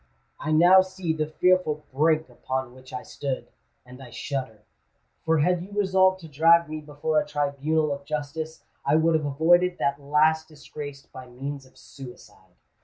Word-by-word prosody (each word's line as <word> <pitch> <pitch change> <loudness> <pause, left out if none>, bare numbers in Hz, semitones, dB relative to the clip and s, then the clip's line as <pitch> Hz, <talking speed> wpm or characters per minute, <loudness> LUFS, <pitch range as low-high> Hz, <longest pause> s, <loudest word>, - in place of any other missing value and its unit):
I 155 - -3
now 175 +4 +7
see 185 -3 -3
the 155 -1 -2
fearful 155 -2 +1
brink 155 +3 +2
upon 130 -1 -5
which 130 0 -15
I 125 -1 -6
stood—and 130 -1 -8
I 130 - -11
shudder; 120 -4 -5 0.6
for 160 -2 +2
had 180 +3 +2
you 185 - -9
resolved 190 -1 +3
to 165 - -10
drag 165 +3 +4
me 155 0 -6
before 150 +1 -1
a 150 - -3
tribunal 150 +1 0
of 140 0 -8
justice, 155 +2 -5 0.2
I 140 - +2
would 160 +1 +3
have 155 -2 +1
avoided 175 +5 +3
that 140 +1 -1
last 155 +2 +2
disgrace 145 -2 -9
by 130 -1 -12
means 135 +2 -7
of - - -24
suicide." 130 -3 -14
150 Hz, 165 wpm, -25 LUFS, 140-160 Hz, 0.6 s, now